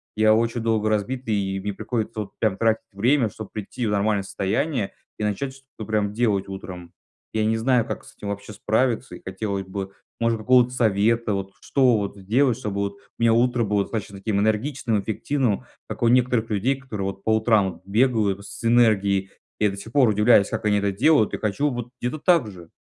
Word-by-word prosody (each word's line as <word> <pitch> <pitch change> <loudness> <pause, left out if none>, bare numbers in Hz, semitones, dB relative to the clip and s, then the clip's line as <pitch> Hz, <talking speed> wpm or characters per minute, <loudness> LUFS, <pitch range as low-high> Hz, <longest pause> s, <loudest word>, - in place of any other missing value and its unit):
я 110 0 +5
очень 115 +1 +1
долго 110 -1 +1
разбитый, 110 +3 -1
и 95 -1 -1
мне 100 +1 -3
приходится 110 +1 -3
вот 95 -2 -9
прям 110 -4 +1
тратить 115 -1 +1
время, 120 +4 +2
чтобы 110 0 -9
прийти 110 +4 -5
в - - 0
нормальное 100 0 +1
состояние 100 +5 -1 0.3
и - - -2
начать 130 +6 -2
что-то 130 -4 -12
прям 105 -2 0
делать 105 -4 +1
утром. 90 -3 -8 0.4
Я 110 - +1
не 110 +1 +1
знаю, 120 +1 +2
как - - -6
с - - -16
этим 100 - -7
вообще 100 +1 -6
справиться, 115 +4 0
и - - -12
хотелось 95 0 -4
бы, 95 0 -5 0.3
может 115 0 +2
быть, 110 - -11
какого-то 125 -1 +6
совета, 115 -1 +1
вот 95 0 -3
что 130 -4 +3
вот 100 -1 -3
сделать, 115 +6 +1
чтобы 105 -2 -4
вот 100 0 -1
у - - -21 0.2
меня 115 -1 +4
утро 120 0 +2
было 105 -1 +1
достаточно 100 -2 -5
таким 100 0 -1
энергичным, 110 +1 0
эффективным, 120 +2 -1 0.2
как - - -6
у 120 - +3
некоторых 120 -2 +2
людей, 115 +6 +1
которые 110 -8 -5
вот 95 0 -7
по 110 - +3
утрам 110 -4 +2
вот - - -18
бегают 105 -2 +1
с 100 +3 -10
энергией. 100 -5 +3 0.3
Я 105 - +3
до - - -6
сих 110 +3 -9
пор 135 -1 +4
удивляюсь, 105 -1 +5
как - - -3
они 105 -1 +3
это 100 -1 0
делают, 135 +2 +3
и - - -1
хочу 110 +8 0
вот 120 -1 -5
где-то 125 +6 -2
так 165 - +3
же. 85 -4 -12
110 Hz, 205 wpm, -23 LUFS, 100-120 Hz, 0.4 s, какого-то